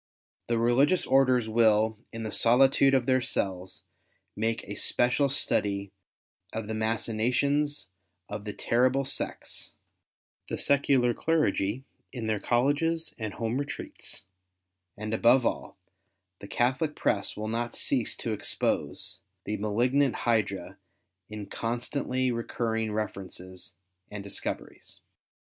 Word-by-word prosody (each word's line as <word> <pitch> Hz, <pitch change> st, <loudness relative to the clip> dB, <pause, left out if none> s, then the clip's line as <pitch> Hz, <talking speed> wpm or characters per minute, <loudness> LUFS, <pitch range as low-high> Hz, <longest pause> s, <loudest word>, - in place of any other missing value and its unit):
The 115 Hz, -, +1 dB
religious 130 Hz, +10 st, +3 dB
orders 130 Hz, -3 st, +4 dB
Avill, 110 Hz, -1 st, +4 dB, 0.2 s
in 115 Hz, 0 st, -5 dB
the 110 Hz, -, -3 dB
solitude 135 Hz, +3 st, +5 dB
of 130 Hz, -3 st, +2 dB
tlieir 130 Hz, -1 st, +3 dB
cells, 95 Hz, -4 st, -3 dB, 0.5 s
make 115 Hz, +1 st, -1 dB
a 105 Hz, -, -6 dB
special 130 Hz, +6 st, +2 dB
study 100 Hz, -7 st, 0 dB, 0.6 s
of 110 Hz, -1 st, -4 dB
the 110 Hz, -, -4 dB
machinations 120 Hz, +7 st, 0 dB, 0.4 s
of 105 Hz, 0 st, -5 dB
the 105 Hz, -, -3 dB
terrible 130 Hz, +3 st, +2 dB
sects, -, -, -4 dB, 0.7 s
the -, -, -2 dB
secular 135 Hz, -3 st, +3 dB
clergy 130 Hz, -7 st, +1 dB, 0.3 s
in 120 Hz, -4 st, -5 dB
their 110 Hz, -1 st, 0 dB
Colleges 145 Hz, +9 st, +1 dB
and 110 Hz, -3 st, -4 dB
home 115 Hz, +3 st, -1 dB
retreats, 145 Hz, -7 st, -6 dB, 0.7 s
and 110 Hz, +1 st, -4 dB
above 120 Hz, +3 st, +5 dB
all, -, -, -2 dB, 0.6 s
the 100 Hz, -, -9 dB
Catholic 130 Hz, +7 st, 0 dB
press 100 Hz, -2 st, 0 dB
Avill 110 Hz, +1 st, -4 dB
not 120 Hz, +1 st, -2 dB
cease -, -, 0 dB
to -, -, -2 dB
expose -, -, -2 dB, 0.2 s
the 105 Hz, 0 st, -2 dB
malig 110 Hz, +5 st, +1 dB
nant 140 Hz, -2 st, +3 dB
hydra 110 Hz, -5 st, -1 dB, 0.5 s
in 105 Hz, -1 st, -6 dB
constantly 125 Hz, +4 st, -1 dB
recurriLg 115 Hz, -1 st, -1 dB
references 95 Hz, -4 st, -6 dB, 0.3 s
and 105 Hz, -1 st, -6 dB
discoveries. 100 Hz, -, -6 dB
115 Hz, 120 wpm, -28 LUFS, 105-130 Hz, 0.7 s, solitude